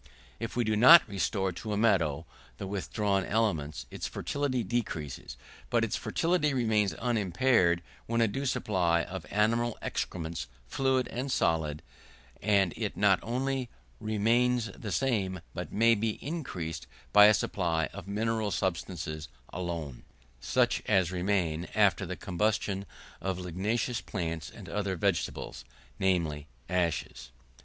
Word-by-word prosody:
If 115 - -4
we 120 - +2
do 110 -1 +1
not 130 +10 +9
restore 95 -1 -1
to 105 +5 -5
a - - 0
meadow 85 -8 +2 0.3
the - - -5
withdrawn 100 0 -1
elements, 85 -10 -1
its - - -4
fertility 140 -4 -1
decreases. 80 - -3 0.3
But 115 -1 +2
its 115 0 0
fertility 165 -4 +1
remains 110 -5 +2
unimpaired, 100 -5 +2 0.2
with 115 +1 0
a 115 - +5
due 135 +7 -2
supply 90 -8 +1
of 95 -2 -7
animal 115 +3 +1
excrements, 80 -5 -3 0.2
fluid 130 - +1
and 130 +3 -3
solid, 80 - +1 0.6
and 100 -4 +3
it - - -3
not - - +4
only 130 +2 -2 0.3
remains 115 +1 +2
the 105 - -6
same, 100 -9 0
but 90 -1 -5
may 115 +2 +5
be 110 0 -1
increased 90 - -4 0.3
by 105 0 +10
a 105 - +7
supply 85 -4 0
of 100 -2 -8
mineral 110 +1 0
substances 85 -4 -3 0.3
alone, 85 -7 -4 0.4
such - - +1
as 95 -2 +3
remain 90 -3 0
after 100 -6 +3
the - - -4
combustion 100 +1 -1 0.3
of 95 -2 -2
ligneous 100 +7 -1
plants 85 -3 -4
and 100 -2 -11
other 100 +2 -2
vegetables; 85 -7 -2 0.4
namely, 80 -6 0 0.2
ashes. 85 -7 -1
100 Hz, 130 wpm, -30 LUFS, 85-115 Hz, 0.6 s, by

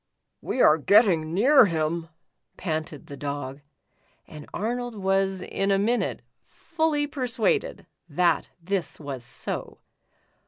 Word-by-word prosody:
"We 255 - 0
are 155 +1 +6
getting 175 -4 +4
near 255 - +6
him," 165 0 -2 0.5
panted 155 -3 -4
the 145 -3 -9
Dog, 140 -1 -5 0.6
and 150 -1 -11
Arnold 245 +2 -3
was 195 -1 0
in 195 +2 -2
a 195 - +4
minute 230 +5 0 0.2
fully 315 -3 -1
persuaded 290 - -1 0.2
that 170 0 +1
this 185 +1 -3
was 140 -5 -6
so. 120 0 -5
185 Hz, 115 wpm, -25 LUFS, 155-235 Hz, 0.6 s, are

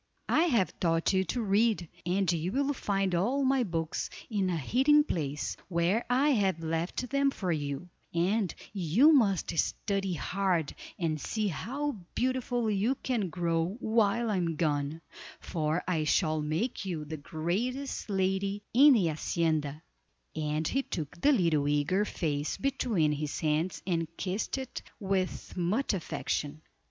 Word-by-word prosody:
I 325 - +4
have 235 - +1
taught 165 +1 +2
you 190 0 +3
to 235 +7 -2
read, 210 -2 +2 0.2
and 185 0 +2
you 170 +1 -1
will 280 +1 +1
find 195 -6 -1
all 240 +11 +1
my 265 0 +3
books 165 -5 -2 0.2
in 200 -3 +1
the 180 - 0
hiding 270 - +4
place, 150 - -2
where 180 +5 +1
I 265 +4 +3
have 195 - +1
left 165 +10 -2
them 280 0 +3
for 190 -9 -2
you, 145 +1 -3 0.2
and 185 +3 +1 0.2
you 205 - +5
must 200 - +2
study 195 -3 -1
hard 180 -3 0 0.2
and 155 -4 -1
see 215 +5 -1
how 275 - -3 0.2
beautiful 245 -2 0
you 210 +6 +1
can 230 -8 0
grow 170 +3 -1
while 225 0 +2
I 200 - +1
am 170 -2 0
gone, 150 0 -1 0.4
for 155 +1 -1
I 160 -4 +1
shall 155 -1 +2
make 160 +13 -2
you 170 -6 -4
the 155 +1 -5
greatest 210 - -3
lady 195 +1 0
in 280 +4 +8
the 210 -8 +3
hacienda;" 155 -1 -1 0.5
and 155 0 -1
he 270 - +1
took 165 - -6
the 290 - +5
little 165 - +2
eager 150 +8 +2
face 150 -6 -2
between 240 - +1
his 150 0 -3
hands 160 +2 0
and 165 -3 0
kissed 195 +7 -2
it 265 -1 -5 0.2
with 190 -3 -2
much 195 +9 0
affection. 155 -4 -3
185 Hz, 150 wpm, -30 LUFS, 160-225 Hz, 0.5 s, in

